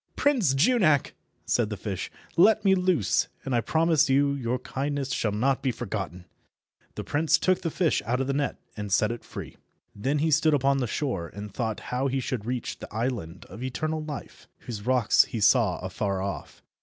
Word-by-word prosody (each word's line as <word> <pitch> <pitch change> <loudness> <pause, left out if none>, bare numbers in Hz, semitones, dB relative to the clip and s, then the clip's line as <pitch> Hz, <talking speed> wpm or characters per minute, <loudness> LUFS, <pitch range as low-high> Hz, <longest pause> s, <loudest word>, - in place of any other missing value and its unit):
"Prince 235 - +2
Junak," 155 - +3 0.3
said 115 -3 +1
the 105 - -4
fish, 95 -1 -4 0.3
"let 215 +4 +5
me 195 - +6
loose, 180 - +2 0.2
and 135 - -2
I 120 - +3
promise 160 +1 +2
you 140 +1 +3
your 125 -3 -1
kindness 135 +1 -3
shall 110 -4 0
not 130 +6 +1
be 130 - +1
forgotten." 90 -5 -5 0.7
The - - -4
prince 155 +2 +2
took 185 +1 +1
the 165 - -1
fish 165 0 +1
out 125 +2 +1
of 135 - 0
the 140 - -1
net 140 0 -1 0.2
and 105 -1 -5
set 105 +3 +3
it 120 - -6
free. - - -9 0.4
Then 135 +8 0
he 155 +2 +1
stood 155 0 +4
upon 140 0 +2
the 125 - -1
shore, 110 - -2
and 100 +4 -9
thought 110 -3 -2
how 130 +2 +1
he 135 0 0
should 125 -4 -3
reach 125 -1 -3
the - - -9
island 110 -7 -3
of 100 +6 -11
eternal 155 +5 -2
life, 150 -2 -8
whose 110 -2 -7
rocks 125 -4 +4
he 115 - -5
saw 105 - +4
afar 100 -2 -2
off. 100 +1 -6
130 Hz, 195 wpm, -27 LUFS, 110-155 Hz, 0.7 s, me